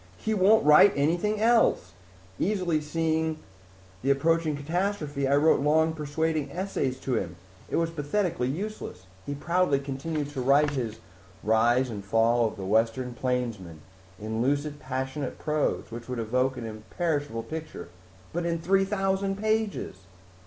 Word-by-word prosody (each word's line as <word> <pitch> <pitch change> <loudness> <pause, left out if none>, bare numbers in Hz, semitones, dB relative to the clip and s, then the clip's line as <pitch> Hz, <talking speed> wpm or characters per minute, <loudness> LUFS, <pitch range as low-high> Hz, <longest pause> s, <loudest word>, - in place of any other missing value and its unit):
"He 220 - -2
won't 210 0 +4
write 150 +7 +7
anything 175 +9 +1
else! 225 - +3 0.5
Easily 180 -6 +1
seeing 160 +1 -1 0.6
the 135 - -1
approaching 155 +2 +2
catastrophe, 155 -3 -1
I 140 - +3
wrote 155 +3 +4
long 160 +2 +3
persuading 155 -1 -1
essays 155 -7 -2
to 130 - -2
him. 90 -6 -2 0.3
It - - -2
was 165 0 +1
pathetically 165 -2 -1
useless. 165 - -5 0.3
Proudly 175 -3 +2
he 135 - -7
continued 145 +2 -3
to 135 - -4
write 140 +3 +4
his 120 -6 -3 0.5
Rise 120 +4 +3
and 100 -2 -6
Fall 115 +3 +3
of 110 - -7
the 95 - -5
Western 115 +5 +1
Plainsman 115 -10 -3 0.4
in 110 +1 -6
a 110 - -2
lucid, 145 +4 0
passionate 130 +1 -4
prose 150 -5 -1
which 120 +2 -8
would 125 - -3
evoke 125 +4 0
an 120 - -5
imperishable 115 +3 -3
picture 155 - -7 0.4
but 175 +1 -1
in 170 0 0
three 190 +4 +2
thousand 195 0 0
pages." 215 - -1
145 Hz, 145 wpm, -27 LUFS, 125-170 Hz, 0.6 s, write